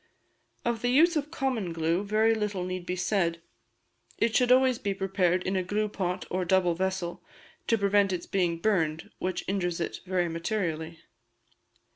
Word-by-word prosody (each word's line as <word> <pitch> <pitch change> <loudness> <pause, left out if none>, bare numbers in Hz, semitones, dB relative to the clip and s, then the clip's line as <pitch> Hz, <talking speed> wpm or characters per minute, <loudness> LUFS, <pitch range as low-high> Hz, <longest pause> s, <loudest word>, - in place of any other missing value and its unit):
Of 235 -1 0
the 245 - +1
use 325 +7 +5
of 300 -1 -1
common 255 - -2
glue 165 +3 0
very 215 +2 +3
little 210 -4 -2
need 185 -1 -5
be 180 - -1
said; 180 -2 0 0.8
it 230 -1 +1
should 250 -1 +4
always 255 -1 +4
be 200 -1 -2
prepared 190 -2 +1
in 190 - -1
a 185 - +2
gluepot 195 -1 -2
or 185 0 0
double 180 -1 +3
vessel, 185 0 -3 0.4
to 230 - +3
prevent 200 -1 +3
its 175 -2 -3
being 175 -3 0
burned, 165 -5 0
which 185 -1 -2
injures 180 -3 -1
it 170 - -3
very 180 -1 +1
materially. 165 -2 -3
190 Hz, 160 wpm, -28 LUFS, 175-215 Hz, 0.8 s, use